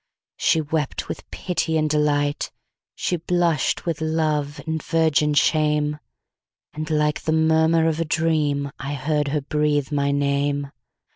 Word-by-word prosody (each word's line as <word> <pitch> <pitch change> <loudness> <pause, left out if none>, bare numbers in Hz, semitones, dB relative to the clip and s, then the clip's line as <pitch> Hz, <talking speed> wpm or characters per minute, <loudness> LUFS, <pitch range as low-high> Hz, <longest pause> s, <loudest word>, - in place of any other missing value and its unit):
She 160 - +2
wept 150 -1 -2
with - - -7
pity 165 -3 -1
and 155 0 +1
delight, 145 -1 0 0.4
She 180 - -1
blush'd 170 -1 +1
with 165 -2 -3
love 155 -2 0
and 160 -1 -2
virgin 155 -2 +2
shame; 150 0 +2 0.7
And 155 +1 -5
like 150 -1 +1
the 155 - -1
murmur 160 +1 +3
of 160 0 0
a 165 - 0
dream,I 145 -3 -1
heard 150 +1 0
her 145 +1 0
breathe 150 0 0
my 140 -1 +1
name. 140 0 0
150 Hz, 135 wpm, -23 LUFS, 145-160 Hz, 0.7 s, murmur